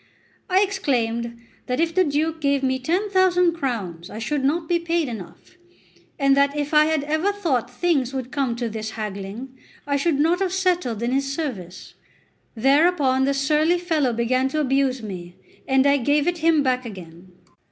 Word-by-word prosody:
I 375 +2 +4
exclaimed 235 - -1 0.3
that 250 +2 -1
if 330 0 +1
the 370 +2 +4
Duke 315 +1 -1
gave 280 -1 +1
me 260 0 0
ten 360 +10 -1
thousand 360 -2 +3
crowns 210 - -4
I - - -8
should 270 +5 -2
not 315 +4 0
be 345 0 +1
paid 335 -2 -1
enough, 225 - -10 0.6
and 275 -2 +3
that 280 +1 +2
if 290 +1 -3
I 300 0 +6
had 315 -2 0
ever 315 +7 0
thought 300 - -1
things 270 -2 0
would 260 -2 -5
come 270 -5 -1
to 240 0 -3
this 220 0 -5
haggling, 210 +5 -6 0.3
I 280 0 0
should 285 0 0
not 330 +4 +2
have 380 -2 -1
settled 355 - 0
in 240 - 0
his 275 +1 0
service. 225 - -6 0.6
Thereupon 270 +1 +3
the 280 0 +1
surly 305 +5 +2
fellow 320 -7 0
began 255 +3 0
to 310 - -2
abuse 270 -3 +1
me, 180 -4 -8 0.3
and 265 0 +3
I 285 0 +4
gave 285 +4 +1
it 350 -1 0
him 320 -2 +3
back 255 -1 0
again. 180 -4 -11
275 Hz, 180 wpm, -23 LUFS, 240-325 Hz, 0.6 s, I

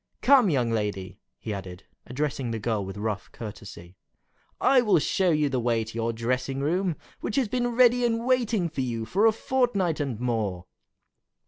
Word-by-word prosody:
Come, 255 -6 +6
young 125 -7 +1
lady," 105 -4 -3 0.2
he 110 - -5
added, 95 -2 -8 0.2
addressing 135 -1 -2
the 115 - -2
girl 110 -1 -1
with 95 +1 -7
rough 105 -1 -4
courtesy, 100 -5 -10 0.6
"I 265 -2 +5
will 215 -6 +3
show 185 +4 +1
you 150 -2 +2
the 135 -2 -1
way 115 -1 +1
to 110 - -10
your 115 0 -1
dressing 125 +4 -2
room, 175 +4 0 0.2
which 210 - -4
has 265 -4 +2
been 245 +2 -1
ready 245 0 +5
and 230 0 0
waiting 235 -7 +1
for 155 -4 -4
you 115 -3 -3
for 200 - +3
a - - +6
fortnight 215 - 0
and 135 -7 -3
more." 110 -7 -2
130 Hz, 180 wpm, -26 LUFS, -, 0.6 s, Come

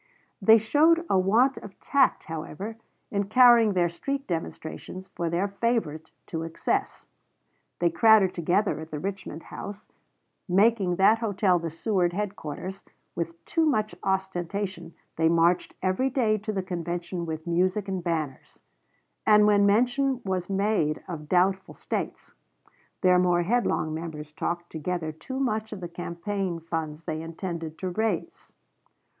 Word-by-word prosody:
They 220 +3 +8
showed 315 +10 +3
a 190 - +4
want 230 +8 +3
of 205 - -12
tact, 275 -1 +2
however, 165 +7 -6 0.4
in 200 -1 0
carrying 235 -1 +6
their 175 -2 +3
street 275 +11 -4
demonstrations 175 +2 -6
for 170 -1 -3
their 175 +4 0
favorite 200 -7 -1 0.2
to 160 - -4
excess; 165 0 -2 0.7
they 170 -1 +2
crowded 205 +1 +5
together 175 +3 +1
at 160 0 -8
the 155 - -5
Richmond 185 -2 -5
House, 205 +1 -9 0.6
making 195 -1 +3
that 205 +5 +5
hotel 200 -5 +2
the 165 0 -3
Seward 175 +1 0
headquarters; 190 -2 -5 0.3
with 170 0 -5
too 330 - +1
much 215 -9 +1
ostentation 190 -2 -2 0.2
they 160 0 +3
marched 170 +1 +2
every 190 +8 +1
day 230 -5 +1
to 215 +2 -4
the 195 -3 -2
convention 175 0 -4
with 160 0 -5
music 185 +4 +1
and 190 -2 -3
banners; 160 -6 -4 0.6
and 210 -1 +7
when 205 -1 +5
mention 250 +5 +2
was 185 -1 -2
made 195 -6 0
of 155 -4 -7
doubtful 190 +1 +1
States, - - -5 0.7
their 180 -1 +5
more 175 -1 +3
headlong 190 -6 0
members 155 -2 -6
talked 170 +3 -3
altogether 165 0 -4
too 165 +13 -7
much 220 -5 -1
of 210 - -6
the 175 - -5
campaign 175 +1 -4
funds 160 -1 -4
they 155 0 -3
intended 165 -1 -5
to 185 -1 -3
raise. 215 -2 -3
185 Hz, 140 wpm, -26 LUFS, 170-210 Hz, 0.7 s, They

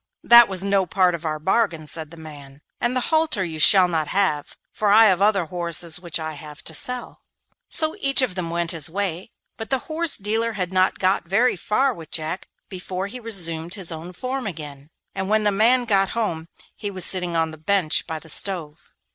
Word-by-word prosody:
'That 235 0 +8
was 190 -1 -2
no 195 -2 +1
part 185 0 +2
of 170 -1 -6
our 155 -1 -2
bargain,' 170 -1 0
said 155 0 -6
the 170 - -14
man, 145 -3 -12 0.2
'and 240 +1 -1
the 255 +5 -2
halter 315 -11 +2
you 160 -3 -5
shall 185 +3 +7
not 160 -3 -1
have, 185 -5 -1 0.2
for 210 - 0
I 220 +2 +7
have 190 -3 +3
other 200 -3 +3
horses 170 0 -1
which 170 -2 -3
I 160 0 -4
shall 150 - -10
have 150 0 -11
to 160 - -6
sell.' 250 +9 -2 0.5
So 315 -1 +1
each 275 -1 +3
of 240 -7 -1
them 180 -2 -4
went 170 0 -2
his 160 -3 +2
way. 185 +1 -3 0.3
But 225 - -7
the 265 - +2
horse 325 0 0
dealer 225 +3 -1
had 185 -3 -4
not 185 0 +2
got 185 -2 0
very 230 +8 +2
far 255 +9 0
with 165 -7 -12
Jack 160 +3 -4 0.2
before 185 0 -5
he 235 +5 -8
resumed 175 -7 -1
his 185 -4 -3
own 165 +2 -7
form 255 +6 -4
again, 150 -5 -8 0.2
and 190 0 -4
when 215 0 +2
the 205 - +2
man 240 +5 +3
got 195 -4 +2
home 165 -8 -2 0.3
he 205 - -5
was 185 -3 0
sitting 180 -2 0
on 160 -1 0
the 160 - -11
bench 180 -1 +1
by 160 -2 -4
the 160 - -13
stove. 160 -3 -2
185 Hz, 215 wpm, -22 LUFS, 160-215 Hz, 0.5 s, That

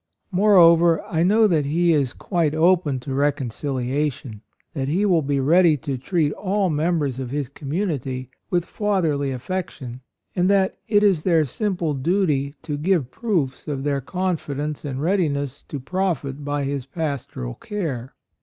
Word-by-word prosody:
Moreover, 175 -4 +5
I 170 -6 -1
know 210 +6 +4
that 160 -8 +2
he 170 +3 +3
is 140 -5 +1
quite 165 -2 -1
open 165 -4 +3
to 135 +1 -5
reconciliation: 135 -3 -2 0.3
that 135 -3 -2
he 180 +8 +1
will 175 -5 +3
be 140 -1 0
ready 160 +3 +4
to 135 +1 -4
treat 150 +1 0
all 195 -2 0
members 150 -4 0
of 130 -2 -4
his 140 -1 -3
community 140 - -3 0.2
with 175 -1 +1
fatherly 165 -9 0
affection; 130 -3 -5 0.3
and 180 +1 +2
that 195 -1 +2
it 205 -2 +3
is 190 -7 +4
their 165 -3 +3
simple 175 - -1
duty 145 -2 0
to 150 -3 -3
give 160 -6 +1
proofs 170 - -2
of 140 -3 -3
their 140 -1 0
confidence 150 -3 -3
and 140 -1 -4
readiness 145 -7 0
to 145 - -5
profit 150 -3 -2
by 145 0 -1
his 135 -1 -3
pas 145 -3 -3
toral - - -6
care. 145 - -4
150 Hz, 155 wpm, -23 LUFS, 140-180 Hz, 0.3 s, Moreover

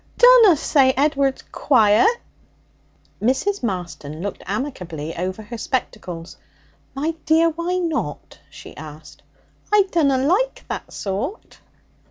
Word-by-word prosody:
Dunna 485 -8 +7
say 270 -2 +3
Ed'ard's 275 -1 +1
quiet!' 250 - +3 1.0
Mrs. 265 - 0
Marston 175 -7 -5
looked 200 - -5
amicably 180 - -4
over 185 +4 -4
her 230 +2 -8
spectacles. 185 -10 -4 0.6
'My 305 +4 -1
dear, 330 +1 +4
why 340 +3 -3
not?' 320 - -3
she - - -12
asked. 155 +1 -11 0.5
'I 420 -1 +6
dunna 285 -6 +2
like 370 - 0
that - - -5
sort.' 215 - -5
260 Hz, 110 wpm, -21 LUFS, -, 1.0 s, Dunna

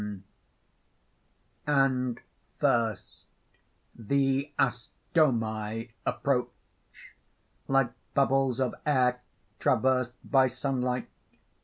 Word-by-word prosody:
_ 100 -2 -7 1.5
And 130 -4 +2 0.4
first: 110 -4 0 0.7
THE 135 +4 0
ASTOMI 115 -4 0 0.2
_approach, 130 -3 +1 1.2
like 135 -3 +2 0.2
bubbles 135 -2 +2
of 130 -2 0
air 125 -4 +2 0.4
traversed 130 -2 +2
by 135 -1 +4
sunlight. 125 -1 -2
125 Hz, 65 wpm, -28 LUFS, 120-135 Hz, 1.5 s, by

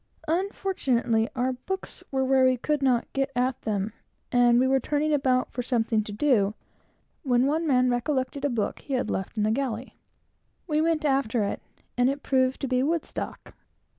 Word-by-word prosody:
Unfortunately, 290 - 0
our 255 +1 0
books 380 +10 -6
were 265 -1 0
where 265 0 +4
we 255 0 +4
could 300 +4 -1
not 255 -3 +2
get 270 0 0
at 250 +1 0
them, 210 0 -2 0.4
and 245 -1 +5
we 260 - +3
were 265 0 +3
turning 300 +3 0
about 260 -3 +1
for 245 - -3
something 230 -3 0
to 210 - -7
do, 210 -3 +2 0.7
when 250 -4 +2
one 315 +4 0
man 255 -3 +3
recollected 260 +2 -1
a 285 - +2
book 230 -5 -2
he 275 - -4
had 255 - -1
left 190 +3 -4
in 210 - +1
the 215 - +2
galley. 250 -1 -3 0.7
He 305 -2 +1
went 320 -1 +1
after 270 -5 +1
it, 200 - -3 0.4
and 245 +1 +4
it 280 +1 -3
proved 260 -1 +1
to 275 - -1
be 255 0 +1
Woodstock. 320 +4 -3
260 Hz, 180 wpm, -26 LUFS, 240-280 Hz, 0.7 s, and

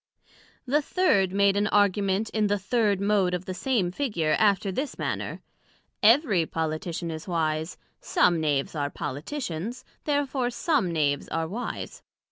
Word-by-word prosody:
The 285 +4 +2
third 230 - +2
made 200 0 +3
an 205 +1 +2
Argument 205 0 +2
in 215 -1 +1
the 205 0 +1
third 205 0 +1
Mode 200 -3 +2
of 180 +1 -5
the 185 - -4
same 195 -2 0
Figure, 180 - 0
after 200 -2 +3
this 270 +9 -3
manner: - - -3 0.6
Every 215 - +4
Politician 165 +1 -3
is 160 +2 -7
wise: 160 -1 -1 0.2
some 170 -2 +2
Knaves 145 -3 0
are 145 -3 -1
Politicians, 185 - -5 0.2
Therefore 280 -4 0
some 250 - 0
Knaves 145 -3 0
are 165 0 -2
wise. 230 +8 -5
195 Hz, 140 wpm, -26 LUFS, 165-230 Hz, 0.6 s, Every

